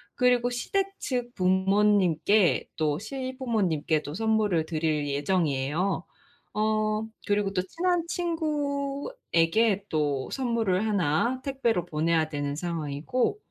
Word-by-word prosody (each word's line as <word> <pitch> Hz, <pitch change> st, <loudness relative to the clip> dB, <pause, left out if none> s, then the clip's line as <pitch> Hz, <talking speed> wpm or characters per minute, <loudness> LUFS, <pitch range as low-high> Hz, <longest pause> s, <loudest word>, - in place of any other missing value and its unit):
그리고 245 Hz, -1 st, +3 dB
시댁 390 Hz, +11 st, -2 dB
측 245 Hz, -2 st, -3 dB
부모님께 190 Hz, -1 st, +3 dB
또 150 Hz, -2 st, +1 dB
시부모님께도 215 Hz, -, -1 dB
선물을 210 Hz, -5 st, +1 dB
드릴 155 Hz, -2 st, 0 dB
예정이에요. 150 Hz, +2 st, 0 dB, 0.5 s
어 215 Hz, 0 st, +1 dB, 0.2 s
그리고 205 Hz, -1 st, +1 dB
또 180 Hz, -, +1 dB
친한 340 Hz, -, 0 dB
친구에게 280 Hz, -, 0 dB
또 145 Hz, -4 st, 0 dB
선물을 225 Hz, -7 st, 0 dB
하나 210 Hz, -, +1 dB
택배로 240 Hz, -9 st, 0 dB
보내야 160 Hz, -1 st, +1 dB
되는 145 Hz, -1 st, -3 dB
상황이고 165 Hz, -, -1 dB
205 Hz, 250 characters per minute, -27 LUFS, 160-250 Hz, 0.5 s, 그리고